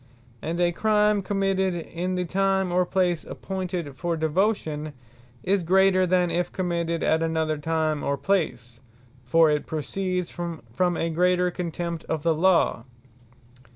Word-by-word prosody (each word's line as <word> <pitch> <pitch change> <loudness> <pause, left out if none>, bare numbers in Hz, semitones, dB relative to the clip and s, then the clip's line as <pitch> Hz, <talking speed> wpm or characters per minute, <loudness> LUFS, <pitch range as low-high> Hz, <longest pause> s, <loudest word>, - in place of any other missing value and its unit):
And 165 +2 -3
a 175 -1 +3
Crime 210 +1 +2
committed 195 -1 0
in 175 +2 -3
the 180 0 -1
Time, 190 +1 +1
or 180 0 +2
Place 180 -3 +1
appointed 180 -6 -5
for 170 +4 -2
Devotion, 160 -2 0 0.5
is 195 +1 +2
greater, 185 +1 +4
than 180 -1 +2
if 175 +1 -1
committed 170 -2 -2
at 160 +1 +2
another 160 -2 0
time 155 -1 -1
or 140 - 0
place: 125 -11 -1 0.4
for 160 +5 +4
it 150 -1 -1
proceeds 180 +3 -3
from 170 -2 -6 0.3
a 165 - -1
greater 180 +2 +2
contempt 170 -1 -4
of 160 -2 -3
the 165 -1 +3
Law. 165 -8 +2
175 Hz, 140 wpm, -25 LUFS, 160-185 Hz, 0.5 s, greater